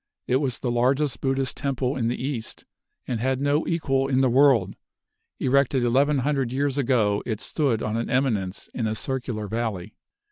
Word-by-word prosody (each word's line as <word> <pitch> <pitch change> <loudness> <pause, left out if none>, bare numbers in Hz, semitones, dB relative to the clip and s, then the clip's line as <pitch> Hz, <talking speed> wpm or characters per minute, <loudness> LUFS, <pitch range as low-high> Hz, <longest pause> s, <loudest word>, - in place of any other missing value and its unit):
It 125 - +2
was 135 -3 -1
the 125 - -2
largest 130 +4 +1
Buddhist 135 -1 -1
Temple 135 -1 -1
in 115 -3 -1
the 120 - -2
east, 130 -4 -5 0.4
and 120 -3 -2
had 130 +2 0
no 145 +2 +1
equal 135 -5 0
in 135 -1 +2
the 130 -2 +3
world. 125 -7 +4 0.6
Erected 135 -1 +2
eleven 140 +5 +3
hundred 135 -2 0
years 140 +1 0
ago, 115 -6 +2
it 110 -3 -3
stood 130 -7 -1
on 110 0 -2
an 115 - -2
eminence 110 -8 -1
in 115 -3 -1
a 110 - -2
circular 120 -3 -3
valley. 110 -3 -3
130 Hz, 175 wpm, -25 LUFS, 115-135 Hz, 0.6 s, world